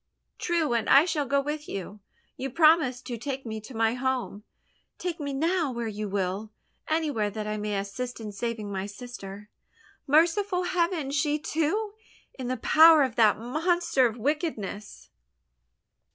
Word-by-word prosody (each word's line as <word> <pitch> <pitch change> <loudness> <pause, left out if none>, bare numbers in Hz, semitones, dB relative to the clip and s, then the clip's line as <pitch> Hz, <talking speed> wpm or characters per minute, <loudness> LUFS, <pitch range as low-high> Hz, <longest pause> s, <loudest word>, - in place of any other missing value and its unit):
"True 335 -6 0
and 230 -2 0
I 280 +4 +7
shall 310 -5 -1
go 280 +1 +2
with 295 +2 -5
you. 200 +2 -6 0.4
You 270 - -4
promised 305 -3 +3
to 240 -2 -5
take 270 +1 -4
me 220 -1 -5
to 230 +3 -11
my 225 0 +2
home! 255 -5 -2 0.5
Take 350 -2 -4
me 285 -1 -3
now 320 +2 0
where 235 -1 -4
you 210 -1 -4
will 195 +2 -2 0.4
anywhere 300 -10 0
that 215 +1 -5
I 210 0 -2
may 210 -1 -2
assist 220 +6 -4
in 215 -2 -6
saving 215 0 -4
my 195 0 -3
sister. 205 -2 -9 0.6
Merciful 360 +6 +3
heaven! 345 -5 0
She, 290 +1 +1
too, 330 +8 -1 0.4
in 255 -2 -6
the 255 +1 -1
power 315 +5 +7
of 255 -4 -2
that 215 -3 +5
monster 310 - +1
of 225 0 -6
wickedness!" 230 - -3
260 Hz, 155 wpm, -27 LUFS, 215-310 Hz, 0.6 s, I